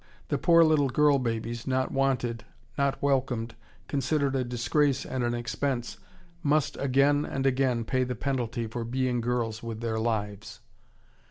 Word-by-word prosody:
The - - 0
poor 170 0 +6
little 155 -4 +3
girl 145 +2 +4
babies, 115 -1 -3
not 130 0 0
wanted, 125 -3 0 0.3
not 140 -1 0
welcomed, 130 -5 0 0.3
considered 140 0 0
a 130 - +1
disgrace 125 +3 +1
and 130 -1 -2
an 120 0 0
expense, 120 +1 -2 0.4
must 150 -2 +1
again 140 +2 +3
and 135 -2 -3
again 130 -3 +1
pay 130 +2 +1
the 125 0 -3
penalty 120 -3 -2
for 115 +2 -4
being 125 0 -1
girls 115 -2 -1
with 115 -2 -6
their 110 -1 -1
lives. 110 -2 -3
130 Hz, 150 wpm, -28 LUFS, 115-140 Hz, 0.4 s, poor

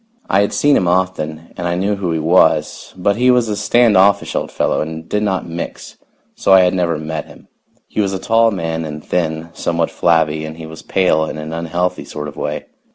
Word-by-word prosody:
I 100 - +4
had 100 - 0
seen 145 -1 +3
him 90 - +2
often, 85 -3 -1
and 85 - -3
I 85 - 0
knew 100 +3 0
who 95 -4 -2
he 80 - 0
was, 80 +4 +2
but 100 +3 +1
he 125 +1 +3
was 125 -2 +4
a 105 - -1
stand 110 +2 +3
offish 100 +2 +3
old - - -2
fellow - - 0
and 80 +1 -6
did 105 - -1
not 95 -4 -1
mix, 85 +1 -7 0.4
so 95 - +2
I 95 - +8
had 90 -1 +3
never 85 -3 0
met 80 +1 -4
him. - - -17 0.4
He - - -1
was 100 -2 0
a 95 - -2
tall 115 +4 +3
man 80 -5 -3
and 75 -1 -7
thin, 80 -1 -2
somewhat 85 -1 -1
flabby 80 -2 +1
and 80 +1 -7
he 80 - -8
was 80 0 -10
pale 90 -4 +1
in 75 - -6
an 75 +1 -6
unhealthy 85 +2 -2
sort 75 0 -6
of 75 - -9
way. - - -4
85 Hz, 220 wpm, -17 LUFS, 80-100 Hz, 0.4 s, I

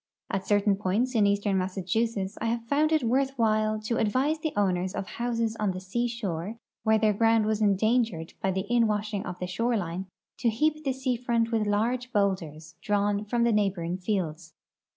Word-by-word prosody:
At 195 -1 -2
certain 205 -1 +3
points 210 +6 0
in 215 -4 +4
eastern 200 -1 +1
Massachusetts 190 +2 -1
I 230 - 0
have 230 0 -1
found 300 +5 +2
it 310 -4 +3
wortli 265 +3 +1
while 215 -1 +2
to 225 +2 -1
advise 260 +8 +1
tlie 315 0 -2
owners 185 -1 +1
of - - -3
houses 230 0 -2
on 205 -3 +1
the 185 - -5
sea 220 +6 -1
shore 210 -3 -4 0.2
where 220 0 +3
their 215 -1 +3
ground 225 +1 +3
was 215 0 0
endangered 215 -4 +1
I)}'' 195 - +2
the 190 +1 -1
inwashing 215 -3 +1
of 180 0 -5
the 180 - -3
shoreline 190 -3 -2 0.3
to 235 - +2
heap 305 +7 0
the 270 -3 0
sea 260 -1 -1
front 235 -1 0
with 220 -2 +1
large 240 +5 0
boulders 175 - -1
drawn 205 0 0
from 235 +2 0
the 235 - +3
neiglil^oring 185 -4 0
fields. 175 -5 -3
215 Hz, 185 wpm, -27 LUFS, 190-235 Hz, 0.3 s, in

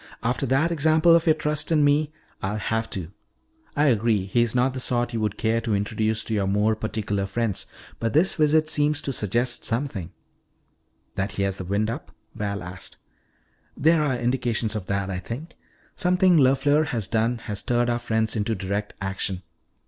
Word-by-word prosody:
"After 125 +3 0
that 135 +7 +2
example 160 +1 +4
of 170 +1 +2
your 160 - +6
trust 150 0 -1
in 155 -2 +4
me, 145 +1 +3 0.3
I'll 100 +3 -2
have 110 +2 -1
to. 90 -5 -5 0.6
I 145 - +3
agree, 110 -6 +2
he 100 +5 +1
is 120 0 0
not 130 +1 +2
the 130 - -4
sort 120 -1 -1
you 115 - -1
would 105 -2 -1
care 115 +1 +1
to 110 -2 0
introduce 110 +2 -1
to 110 - -4
your 100 -2 +1
more 105 +3 +2
particular 105 -2 -2
friends. 110 -1 -2 0.3
But 115 -1 -1
this 165 +6 +4
visit 155 -1 +3
seems 150 -1 +1
to 135 - -2
suggest 120 +3 0
something 115 - -3 0.5
" - - -44
"That 95 +1 -1
he 100 - -1
has 95 -1 -1
the 95 - -5
wind 105 +4 0
up?" 135 +6 -7 0.2
Val 100 -2 -3
asked. 90 0 -7 0.8
"There 160 +2 +4
are 135 -4 +1
indications 120 -3 0
of 100 -4 -4
that, 100 -1 -1
I 90 - -3
think. 130 - -7 0.4
Something 180 0 +3
LeFleur 145 +2 +4
has 115 -8 -2
done 115 +2 +1
has 110 -3 -5
stirred 120 0 +1
our 120 0 0
friends 110 -1 0
into 110 +1 0
direct 100 +2 -3
action. 95 -1 -3
115 Hz, 185 wpm, -24 LUFS, 105-145 Hz, 0.8 s, your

